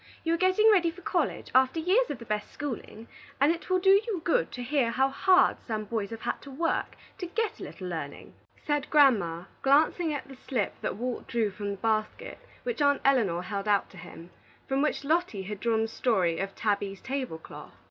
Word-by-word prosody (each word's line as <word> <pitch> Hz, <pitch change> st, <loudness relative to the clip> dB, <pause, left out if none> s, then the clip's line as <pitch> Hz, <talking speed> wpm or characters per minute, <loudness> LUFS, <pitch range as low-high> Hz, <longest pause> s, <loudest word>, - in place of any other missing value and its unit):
You 330 Hz, -, +1 dB
are -, -, +2 dB
getting 375 Hz, +5 st, +4 dB
ready 355 Hz, -5 st, +4 dB
for 345 Hz, +2 st, -11 dB
college, 335 Hz, -5 st, -1 dB
after 260 Hz, +4 st, +4 dB
years 390 Hz, +10 st, +2 dB
of 285 Hz, -, -3 dB
the 235 Hz, -, -11 dB
best 210 Hz, -1 st, -3 dB
schooling, 235 Hz, -5 st, -6 dB, 0.3 s
and 285 Hz, +4 st, +5 dB
it 335 Hz, +2 st, -5 dB
will 370 Hz, -, +3 dB
do 385 Hz, +1 st, +4 dB, 0.2 s
you 410 Hz, -6 st, -1 dB
good 320 Hz, -, +1 dB
to 245 Hz, -, -5 dB
hear 260 Hz, -2 st, +1 dB
how 265 Hz, +3 st, +2 dB
hard 370 Hz, +7 st, +4 dB
some 215 Hz, -2 st, -3 dB
boys 210 Hz, -2 st, -3 dB
have 225 Hz, -1 st, -7 dB
had -, -, -3 dB
to 280 Hz, -, -11 dB
work 325 Hz, +5 st, -1 dB, 0.2 s
to 360 Hz, -, -4 dB
get 445 Hz, +5 st, -2 dB
a -, -, -7 dB
little 185 Hz, -, -7 dB
learning," 160 Hz, -5 st, -6 dB, 0.3 s
said 295 Hz, -1 st, -1 dB
Grandma, 205 Hz, -, +4 dB, 0.2 s
glancing 310 Hz, +4 st, +3 dB
at 285 Hz, -2 st, -4 dB
the 270 Hz, -, -11 dB
slip 250 Hz, -4 st, -2 dB
that -, -, -2 dB
Walt 245 Hz, +3 st, -4 dB
drew 225 Hz, -4 st, 0 dB
from 205 Hz, +1 st, -5 dB
the 200 Hz, -, -4 dB
basket 215 Hz, 0 st, -2 dB, 0.2 s
which 475 Hz, -10 st, -3 dB
Aunt 285 Hz, -1 st, +3 dB
Elinor 210 Hz, -11 st, +3 dB
held 200 Hz, +1 st, -4 dB
out 205 Hz, -1 st, +2 dB
to 190 Hz, -, -14 dB
him, 175 Hz, +1 st, -11 dB
and 170 Hz, -, -14 dB, 0.4 s
from 270 Hz, +1 st, +1 dB
which 300 Hz, -1 st, 0 dB
Lotty 300 Hz, -, 0 dB
had 205 Hz, +1 st, -6 dB
drawn 225 Hz, 0 st, +1 dB
the -, -, -1 dB
story 190 Hz, -8 st, +1 dB
of 195 Hz, 0 st, -4 dB
"Tabby's 200 Hz, -2 st, -1 dB
Table 260 Hz, -10 st, -4 dB
Cloth." 160 Hz, -, -12 dB
255 Hz, 215 wpm, -28 LUFS, 210-315 Hz, 0.4 s, and